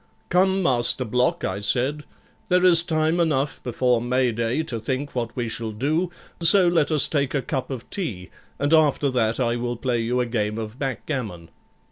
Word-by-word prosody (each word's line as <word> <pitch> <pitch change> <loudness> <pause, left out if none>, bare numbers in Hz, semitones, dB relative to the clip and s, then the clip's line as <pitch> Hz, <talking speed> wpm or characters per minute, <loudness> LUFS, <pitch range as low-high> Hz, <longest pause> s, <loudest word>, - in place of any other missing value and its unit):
'Come, 190 +1 +2
Master 125 -1 +1
Block,' 125 +3 0
I 95 +2 -2
said, 130 +8 0 0.4
'there 180 0 +3
is 170 -2 +8
time 160 0 0
enough 150 -4 0
before 125 -1 0
May 125 +1 +1
Day 115 +6 -1
to 120 -7 -5
think 130 +5 -4
what 120 -2 -4
we 120 -2 -2
shall 115 0 -4
do, 155 - -1 0.3
so 175 +2 +6
let 170 -4 +2
us 155 -3 +4
take 140 -3 -1
a 140 - +1
cup 135 +1 -4
of 130 -3 -7
tea, 100 - -4 0.3
and 145 +3 0
after 150 -3 +3
that 115 -2 0
I 120 -1 0
will 120 0 -3
play 120 -1 -1
you 120 +2 -1
a 125 - +1
game 105 -2 -2
of 110 +2 -7
backgammon.' 120 - -5
130 Hz, 185 wpm, -23 LUFS, 115-155 Hz, 0.4 s, is